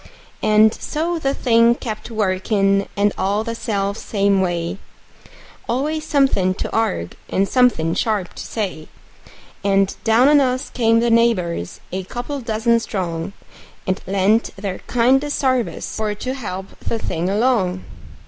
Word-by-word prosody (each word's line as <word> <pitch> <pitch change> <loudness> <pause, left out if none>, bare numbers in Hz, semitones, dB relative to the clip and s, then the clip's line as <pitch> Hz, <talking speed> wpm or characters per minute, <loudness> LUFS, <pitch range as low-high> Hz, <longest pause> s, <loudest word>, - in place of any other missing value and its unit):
And 215 +1 +5
so 330 +3 -2
the 275 -2 0
thing 235 -1 +4
kept 220 -2 -6
workin', 195 -1 +1
and 205 0 +2
all 200 +3 +1
the 230 0 -3
self 200 -3 -2
same 200 -2 +1
way; 175 +1 -2 0.9
Always 305 +5 -1
somethin' 230 -10 +2
to - - -4
arg'e, 210 - -1 0.2
and 195 +1 +1
somethin' 235 -11 +3
sharp 205 -4 -1
to - - -8
say; 185 -8 -4 0.8
And 195 -1 +2
down 230 +3 +4
on 295 0 +6
us 255 -1 -1
came 230 -2 +3
the 235 0 +2
neighbors, 190 - +1
a 190 +1 -3
couple 245 +8 -5
dozen 230 0 +1
strong, 180 -4 -4 0.5
And 185 +1 -1
lent 200 +4 +2
their 195 -2 -4
kindest 265 +4 +2
sarvice 255 -3 -1
for 215 -1 -1
to 255 +5 -4
help 195 -7 -7
the 230 - -2
thing 175 -4 -2
along. 200 -4 +1
215 Hz, 140 wpm, -20 LUFS, 190-240 Hz, 0.9 s, on